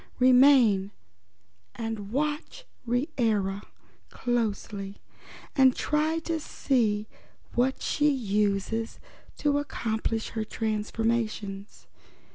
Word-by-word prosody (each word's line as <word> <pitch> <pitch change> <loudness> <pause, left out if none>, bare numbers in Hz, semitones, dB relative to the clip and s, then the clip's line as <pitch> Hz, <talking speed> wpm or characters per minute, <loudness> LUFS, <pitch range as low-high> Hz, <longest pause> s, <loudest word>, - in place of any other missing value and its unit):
Remain 250 -6 +6 0.9
and 225 -3 -5
watch 300 - -2 0.2
Reera 225 -7 0 0.5
closely 210 -4 -2 0.6
and 265 -3 +5
try 305 +2 +1
to 330 0 -2
see 220 -8 0 0.5
what 255 +2 +1
she 295 0 +2
uses 210 -2 0 0.4
to 290 -1 +2
accomplish 225 -5 -2
her 220 -1 -3
transformations. 215 -2 -2
230 Hz, 80 wpm, -27 LUFS, 210-270 Hz, 0.9 s, Remain